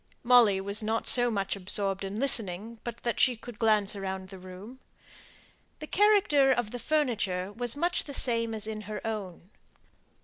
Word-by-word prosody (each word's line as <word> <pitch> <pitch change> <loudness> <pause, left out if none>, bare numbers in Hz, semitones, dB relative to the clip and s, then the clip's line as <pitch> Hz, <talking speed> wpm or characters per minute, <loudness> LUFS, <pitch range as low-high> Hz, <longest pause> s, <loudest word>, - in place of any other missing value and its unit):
Molly 235 -5 +5
was 200 +3 0
not 220 +1 -2
so 245 -1 +5
much 200 -3 -2
absorbed 195 0 -1
in 195 +2 -5
listening 225 -4 -1
but 235 -1 -6
that 235 - -2
she 255 - +4
could 230 -1 -12
glance 215 -3 +2
round 190 -1 -5
the 190 -1 -10
room. 185 +7 -11 1.0
The 305 - -8
character 365 -8 +3
of 240 -4 -1
the 245 - -6
furniture 210 -11 -1
was 240 +2 -3
much 345 +4 -1
the 280 - -7
same 230 -3 +1
as 215 -1 -5
in 215 -1 -5
her 215 - -6
own. 195 -4 -6
220 Hz, 170 wpm, -28 LUFS, 195-245 Hz, 1.0 s, Molly